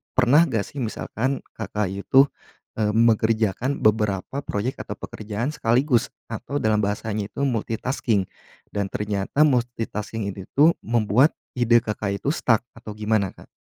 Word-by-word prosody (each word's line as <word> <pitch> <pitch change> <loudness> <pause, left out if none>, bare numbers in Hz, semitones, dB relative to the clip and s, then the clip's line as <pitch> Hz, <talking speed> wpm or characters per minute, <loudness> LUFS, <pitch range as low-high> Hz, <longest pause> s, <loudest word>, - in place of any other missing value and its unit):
pernah 130 +6 +5
nggak 115 -7 0
sih - - -12
misalkan 125 +4 -2 0.2
Kakak 105 -1 -2
itu, 115 +8 +4 0.5
eee, 105 -1 +2
mengerjakan 115 +2 +2
beberapa 105 +3 +1
proyek 115 +4 -2
atau - - -5
pekerjaan 110 +4 -4
sekaligus 125 +1 +2 0.2
atau 145 +1 -3
dalam 110 -1 +2
bahasanya 105 0 -2
itu - - -8
multitasking 115 -3 -1 0.4
dan 100 -2 -3
ternyata 105 +6 -1
multitasking 115 -4 -2
ini 95 -1 -7
tuh 155 +4 +5
membuat 115 - +3 0.3
ide 120 -1 +5
Kakak 105 -3 -3
itu - - -5
stuck 115 -8 +3 0.2
atau 115 -2 -8
gimana, 105 -2 0
Kak? - - -16
110 Hz, 135 wpm, -24 LUFS, 105-125 Hz, 0.5 s, pernah